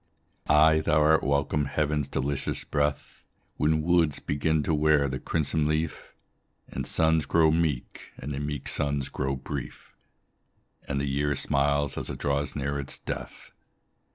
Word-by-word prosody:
Ay, 80 +1 +6
thou 75 0 +2
art 80 +1 +4
welcome, 70 +1 0
heaven's 75 0 -1
delicious 70 0 -2
breath, 75 0 -2 0.3
When 80 0 +2
woods 85 -4 +2
begin 75 +2 0
to 80 - 0
wear 75 -1 +3
the 65 -1 -4
crimson 80 -1 0
leaf, 75 +1 -3 0.5
And - - -5
suns 80 -1 +2
grow 80 -2 +4
meek, 80 -6 -2
and 70 - -6
the 70 - -3
meek 75 -1 -4
suns 70 -1 -1
grow 70 +1 -2
brief, 70 0 -7 0.9
And 70 -1 -1
the 70 - -1
year 70 +1 0
smiles 70 +1 +1
as - - -3
it - - -5
draws 70 -1 -1
near 70 0 -2
its 70 - -3
death. - - -7
75 Hz, 150 wpm, -27 LUFS, 70-75 Hz, 0.9 s, Ay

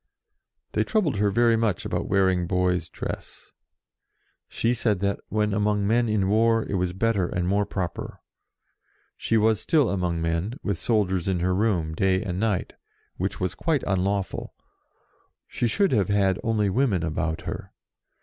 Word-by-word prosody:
They - - +1
troubled 175 - 0
her 105 0 +2
very 115 +3 +3
much 110 -5 0
about - - -2
wear 95 -1 +3
ing 90 -2 0
boy's 90 -2 0
dress. - - -7 1.0
She 115 +1 0
said 110 -5 0
that, 100 0 0
when 105 -1 0
among 105 0 +1
men 115 +2 +2
in 105 -3 +1
war, 115 +2 +3
it - - -4
was 90 -2 0
better 100 -1 0
and 90 0 -2
more 100 +2 +1
proper. 90 -4 -4 1.0
She 115 - 0
was 110 0 +2
still 145 +4 +2
among 90 -3 -1
men, 85 +7 -1
with 100 -5 -2
soldiers 95 -6 0
in 95 -2 +1
her 90 +1 +1
room, 90 -6 0
day 95 +3 +1
and 90 -3 -3
night, 105 -4 -1 0.4
which - - -3
was 90 -1 -1
quite 160 -5 0
unlawful; 95 0 -1 0.9
she 120 - -1
should 200 - +2
have 105 -7 +2
had 100 -2 +2
only 110 -2 +1
women 100 -4 +1
about 80 0 -2
her. - - -6
100 Hz, 160 wpm, -25 LUFS, 90-110 Hz, 1.0 s, very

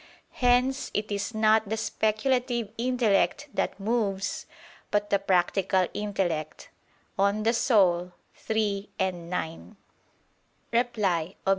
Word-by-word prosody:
Hence 250 +2 +2
it 210 0 -2
is 205 +3 -3
not 220 -1 +3
the 220 - -1
speculative 235 +1 0
intellect 250 +3 +1
that - - -2
moves, 205 -2 -1 0.4
but 205 0 0
the 200 - +4
practical 190 0 +2
intellect 180 -7 -3 0.5
(De - - +4
Anima 200 -4 +2 0.4
iii, 210 -2 0
9). 180 +1 -3 1.0
Reply 200 -8 0
Obj. - - +1
205 Hz, 100 wpm, -27 LUFS, 190-230 Hz, 1.0 s, the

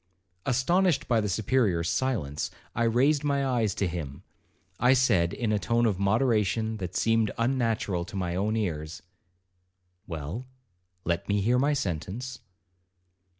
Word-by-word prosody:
'Astonished 170 +6 +2
by 115 -3 +3
the 105 - -2
Superior's 100 -4 +1
silence, 105 - -1 0.2
I 115 - +1
raised 135 +6 +3
my 140 -1 +1
eyes 115 -6 +1
to 100 - 0
him. 80 -6 -6 0.6
I 125 +2 +5
said, 115 -10 +3
in 115 -3 -2
a 105 - +2
tone 115 +5 +1
of 100 -5 +1
moderation 110 +1 +1
that 90 -2 -6
seemed 115 0 +2
unnatural 115 -7 0
to - - -10
my 90 -2 -2
own 105 +4 0
ears, 80 -6 -3 1.0
'Well, 85 - -5 0.6
let 85 +2 -2
me 100 0 +2
hear 120 +5 +2
my 145 +3 +2
sentence.' 105 - -3
110 Hz, 140 wpm, -27 LUFS, 90-125 Hz, 1.0 s, I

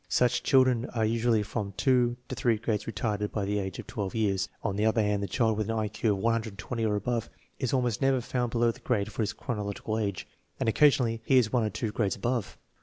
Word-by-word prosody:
Such 125 +4 +2
children 130 -2 +3
are 110 -1 +2
usually 115 -1 +2
from 100 -2 -4
two 125 -3 +2
to - - -5
three 115 -3 +1
grades 110 -1 -2
retarded 105 -2 -2
by 105 -2 -2
the 105 +1 0
age 95 -2 -4
of - - -7
12 105 -5 -4
years. 100 -3 0
On 100 -3 -1
the 105 - 0
other 110 0 +3
hand, 105 -1 0
the 100 - -2
child 110 +1 +1
with 110 0 -1
an 115 - 0
I 110 -1 0
Q 110 0 0
of - - -2
120 115 +1 -2
or 105 -1 +1
above 115 +2 -2 0.3
is 130 -4 -1
almost 125 -5 0
never 135 -1 +3
found 125 0 -2
below 120 0 +2
the - - -14
grade 110 -4 -1
for 100 - -3
his 110 +1 -1
chronological 110 -2 -3
age, 100 -4 -3 0.3
and - - -1
occasionally 115 -2 +3
he 130 - +4
is 120 -2 +3
one 120 -3 +3
or 110 - 0
two 110 +2 -3
grades 105 -3 0
above. 120 +1 -2
110 Hz, 235 wpm, -28 LUFS, 105-120 Hz, 0.3 s, he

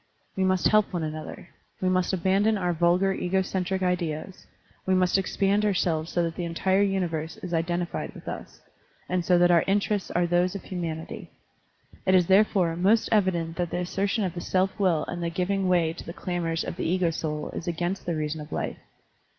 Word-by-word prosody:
We 190 - 0
must 185 -1 +3
help 215 -1 +3
one 175 -3 -2
another, 155 +3 -6 0.3
we 185 - 0
must 185 -1 +2
abandon 195 +4 +2
our 180 -2 0
vulgar 175 +3 +3
ego 190 +1 0
centric 190 0 -2
ideas, 180 -1 -2 0.4
we 190 - +2
must 185 -1 +2
expand 195 +2 +1
ourselves 175 -5 0
so 175 - +1
that 165 -1 -2
the 175 - -3
entire 190 +3 +1
universe 175 -5 -1
is 180 -1 -5
identified 175 +1 -2
with - - -12
us, - - -7 0.5
and 180 -1 0
so 180 +1 +4
that 175 0 +5
our 170 -1 +5
interests 200 0 0
are 175 0 +1
those 175 +2 +1
of 200 - -6
humanity. 165 -3 -5 0.8
It 185 - +5
is 180 -2 +5
therefore 190 -3 +3
most 200 +6 +3
evident 175 -6 +1
that 175 -1 -1
the - - -3
assertion 195 +4 -1
of 185 -3 -2
the 175 - -5
self 190 +2 +1
will 180 -6 +2
and 175 - -5
the 170 - -1
giving 185 +2 0
way 170 -3 +2
to - - -9
the 170 - -7
clamors 170 -3 -2
of - - -5
the - - -2
ego 180 -1 +2
soul 150 -2 -3
is - - -6
against 175 +3 -2
the 170 - 0
reason 155 0 -3
of 150 - -10
life. - - -3
180 Hz, 200 wpm, -26 LUFS, 170-190 Hz, 0.8 s, that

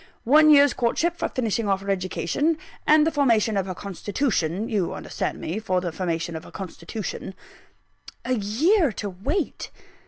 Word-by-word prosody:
One 305 +5 +6
year's 285 -2 +7
courtship 320 +8 0
for - - -2
the - - -16
finishing 230 -3 0
off 195 0 +1
of - - -10
her 200 - 0
education, 195 - -1 0.3
and 305 0 +6
the 325 - +1
formation 230 -7 +2
of 195 -1 0
her 185 - -4
constitution 200 - -2
you 200 -6 -1
understand - - -4
me, 175 +7 -3
for 185 -4 0
the 180 -1 -3
formation 165 -1 -3
of 160 - -6
her - - -12
constitution." 190 +1 -6 0.9
A 255 - 0
year 270 - +2
to 205 0 -4
wait! 290 - -3
215 Hz, 175 wpm, -24 LUFS, 185-285 Hz, 0.9 s, year's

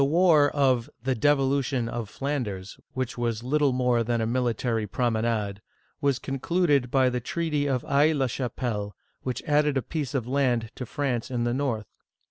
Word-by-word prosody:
The - - +5
war 155 -1 +5
of 130 -5 +2
" - - -40
the 130 - +3
Devolution 135 -1 +1
of 115 -2 -4
Flanders," 115 -10 -4 0.2
which 130 -2 -3
was 115 -1 -1
little 145 +2 +2
more 125 -2 +2
than 120 +1 0
a 110 - 0
military 115 -2 0
promenade, 110 -2 -1 0.4
was 140 -3 +2
concluded 140 -1 +1
by 130 0 +3
the 125 - -1
treaty 150 +2 -1
of 130 -3 0
Aix 150 +3 +4
la 135 -2 +1
Cbapelle, 120 -5 -3 0.3
which 130 -1 -4
added 150 -1 +2
a 130 - 0
piece 145 0 -3
of 125 -4 0
land 125 -4 +1
to 125 - -7
France 130 -4 -2
in 120 -2 -1
the 120 0 0
north. 125 -5 -1
130 Hz, 175 wpm, -26 LUFS, 115-140 Hz, 0.4 s, The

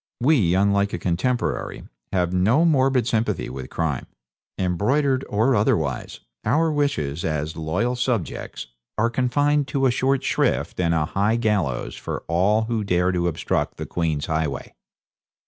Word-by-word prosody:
We, 120 - +3
unlike 100 +1 +2
a - - 0
contemporary, 120 +9 -1 0.3
have 90 -1 0
no 110 - +3
morbid 135 -6 +3
sympathy 115 - -1
with 65 -1 -7
crime 75 -6 -2 0.5
embroidered 130 - +1
or 115 +6 +2
otherwise; 80 - 0 0.2
our 160 +1 +2
wishes, 85 - -1
as 75 0 -2
loyal 90 +11 -1
subjects, 120 - -2 0.3
are 115 +2 +2
confined 145 +4 +1
to 135 -1 0
a 130 - +4
short 135 +2 +1
shrift - - 0
and 85 -2 +2
a 75 -2 +1
high 100 +6 +1
gallows 105 - 0
for - - -5
all 95 +6 +2
who 110 -1 -1
dare 90 -2 +2
to 90 -1 0
obstruct 85 - -1
the - - -4
Queen's 80 -4 -1
highway.' 80 -3 -2
100 Hz, 145 wpm, -23 LUFS, 85-125 Hz, 0.5 s, a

